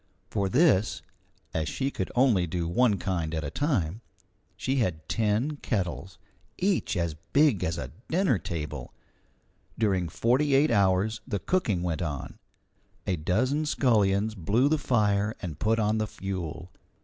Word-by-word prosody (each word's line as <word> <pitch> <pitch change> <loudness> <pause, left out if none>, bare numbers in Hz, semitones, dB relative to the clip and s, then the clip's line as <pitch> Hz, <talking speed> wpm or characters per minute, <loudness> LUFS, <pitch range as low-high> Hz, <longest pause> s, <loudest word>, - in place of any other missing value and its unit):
For 100 -1 0
this, 125 - +3 0.5
as 80 -1 -1
she 135 - -2
could 95 - -4
only 120 -9 +3
do 85 0 -2
one 105 +4 +3
kind 85 -4 -2
at 80 - -2
a 70 - -4
time, 115 - -1 0.6
she 135 +1 -1
had 80 -10 -1
ten 115 - 0
kettles, 95 -6 -3 0.4
each 185 - 0
as 85 -2 0 0.2
big 145 - +4
as 80 0 -1
a 65 -6 -5 0.2
dinner 165 - +2
table. 75 -7 -5 0.8
During 95 -6 +1
forty 135 - +2
eight 145 +3 +4
hours 100 +1 +2
the 105 - -1
cooking 105 - 0
went 85 -1 -2
on; 75 -6 -4 0.7
a 95 - +1
dozen 130 - 0
scullions 110 -6 +2
blew 110 - +2
the 155 0 +2
fire 105 -4 +1
and 80 -5 -6
put 110 +4 +2
on 110 0 +1
the 110 - 0
fuel. 90 -4 -5
100 Hz, 150 wpm, -27 LUFS, 85-125 Hz, 0.8 s, big